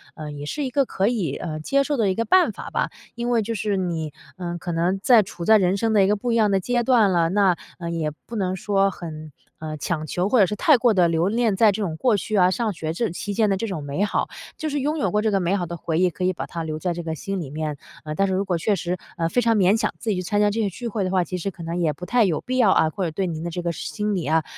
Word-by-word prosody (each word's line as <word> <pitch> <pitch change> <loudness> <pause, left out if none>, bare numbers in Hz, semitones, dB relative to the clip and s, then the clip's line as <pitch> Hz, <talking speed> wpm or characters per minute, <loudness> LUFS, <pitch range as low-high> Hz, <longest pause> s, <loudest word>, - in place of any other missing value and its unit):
呃， 155 -2 -7
也 145 0 -7
是 290 - -3
一 265 - -2
个 275 +2 +2
可 195 -4 0
以， 195 - -1
呃， 155 -3 -5
接 275 - +1
受 290 0 -1
的 215 -4 +2
一 190 - 0
个 230 - 0
办 370 +9 +4
法 - - -8
吧。 - - -1 0.3
因 240 0 -2
为 235 -2 +3
就 225 +2 -3
是 210 -1 -1
你， 165 -5 -2 0.2
呃， 175 -1 -4
可 175 +1 -5
能 170 +3 +1
在 240 -4 +7
处 180 -3 -8
在 220 +3 +7
人 185 -2 +2
生 225 +2 0
的 205 -2 +5
一 - - +3
个 205 - +3
不 235 +4 -2
一 - - +2
样 220 -2 +4
的 195 - +3
阶 240 +4 0
段 230 -5 +4
了， 170 -2 +3
那， 190 -2 +3 0.2
呃， 170 -1 -4
也 160 -2 -1
不 235 - -8
能 185 -2 -1
说 195 +1 +1
很， 155 -4 -8 0.3
呃， 155 -1 -5
强 155 +1 -2
求， 180 +5 -1
或 250 - +4
者 200 - +7
是 210 - -3
太 290 +6 +5
过 240 -1 +3
地 180 -3 +4
留 165 +1 +1
恋 225 0 +1
在 215 +1 +5
这 200 - -4
种 160 -5 -3
过 245 +1 +3
去 215 +2 -3
啊、 180 -1 +5
上 225 +2 0
学 160 -1 -4
这 230 +7 -1
期 205 +3 -4
间 215 0 +2
的 195 - +1
这 225 - -3
种 175 -8 -4
美 145 +7 -2
好， 205 - -1 0.3
就 315 - -3
是 290 0 -1
拥 300 +4 -1
有 - - 0
过 210 - +2
这 220 0 +1
个 195 - +2
美 180 +1 +1
好 180 -3 -1
的 170 +1 -6
回 160 +1 -2
忆， 185 - +4
可 180 +1 -6
以 185 - +3
把 - - -5
它 165 -1 -5
留 155 -1 -4
在 175 +1 -1
这 170 0 -5
个 160 -1 -3
心 195 +4 -4
里 150 -6 -5
面。 150 0 -4 0.3
呃， 155 0 -4
但 195 +3 +2
是 190 - -1
如 195 +2 0
果 180 -3 0
确 200 +5 +1
实， 180 -1 -3 0.2
呃， 165 - +1
非 245 - +2
常 230 -1 +3
勉 195 +2 +4
强 - - -1
自 230 - -4
己 200 - +1
去 - - -1
参 205 +3 -1
加 210 - +4
这 225 +2 -1
个 205 - +1
聚 235 +6 -6
会 210 -2 -2
的 185 - -2
话， 185 -2 +2
其 180 +2 -4
实 195 +3 -3
可 170 - -10
能 165 +1 -3
也 165 -3 +2
不 180 +5 -8
太 240 +3 +3
有 170 -6 +1
必 255 0 -3
要 225 -6 +5
啊， 160 - +4
或 190 +5 -4
者 165 - -1
对 185 +4 -2
您 160 -2 -4
的 170 - -3
这 175 +1 -4
个 170 - -1
心 210 +5 -3
理 180 - -2
啊， 160 +2 +2
190 Hz, 340 characters per minute, -23 LUFS, 170-220 Hz, 0.3 s, 在